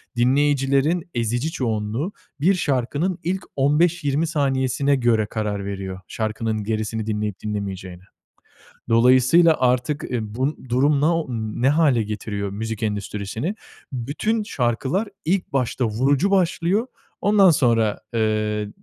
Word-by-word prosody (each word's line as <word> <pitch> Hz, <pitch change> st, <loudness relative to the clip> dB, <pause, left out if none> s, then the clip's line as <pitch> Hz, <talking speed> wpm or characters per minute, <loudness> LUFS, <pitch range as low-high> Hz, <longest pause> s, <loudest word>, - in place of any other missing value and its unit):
Dinleyicilerin 140 Hz, +6 st, +2 dB
ezici 120 Hz, +5 st, -1 dB
çoğunluğu 115 Hz, -, -2 dB, 0.3 s
bir 185 Hz, +6 st, +4 dB
şarkının 145 Hz, +4 st, -1 dB
ilk 185 Hz, +2 st, -2 dB
15-20 150 Hz, +1 st, +2 dB
saniyesine 140 Hz, -2 st, +1 dB
göre 120 Hz, -4 st, +2 dB
karar 105 Hz, -2 st, -3 dB
veriyor 95 Hz, -1 st, -5 dB
şarkının 110 Hz, -1 st, -2 dB
gerisini 110 Hz, 0 st, -2 dB
dinleyip 105 Hz, -2 st, -2 dB
dinlemeyeceğine. 95 Hz, -4 st, -5 dB, 0.9 s
Dolayısıyla 130 Hz, +8 st, +5 dB
artık, 125 Hz, +3 st, +1 dB
ııı, 120 Hz, -2 st, -1 dB
bu 135 Hz, +4 st, -1 dB
durum 140 Hz, +4 st, +2 dB
no 165 Hz, 0 st, +1 dB
ne 115 Hz, +2 st, -1 dB
hâle 145 Hz, -6 st, +3 dB
getiriyor 105 Hz, -1 st, -4 dB
müzik 110 Hz, +2 st, -4 dB
endüstrisini? 105 Hz, -, -3 dB, 0.4 s
Bütün 150 Hz, -, -1 dB
şarkılar 135 Hz, -, -1 dB, 0.2 s
ilk 180 Hz, -1 st, 0 dB
başta 125 Hz, -1 st, 0 dB
vurucu 135 Hz, -, +1 dB
başlıyor, 190 Hz, +4 st, +1 dB, 0.3 s
ondan 205 Hz, -2 st, +5 dB
sonra, 115 Hz, -7 st, +2 dB
eee, 110 Hz, -1 st, 0 dB
125 Hz, 110 wpm, -22 LUFS, 110-155 Hz, 0.9 s, Dolayısıyla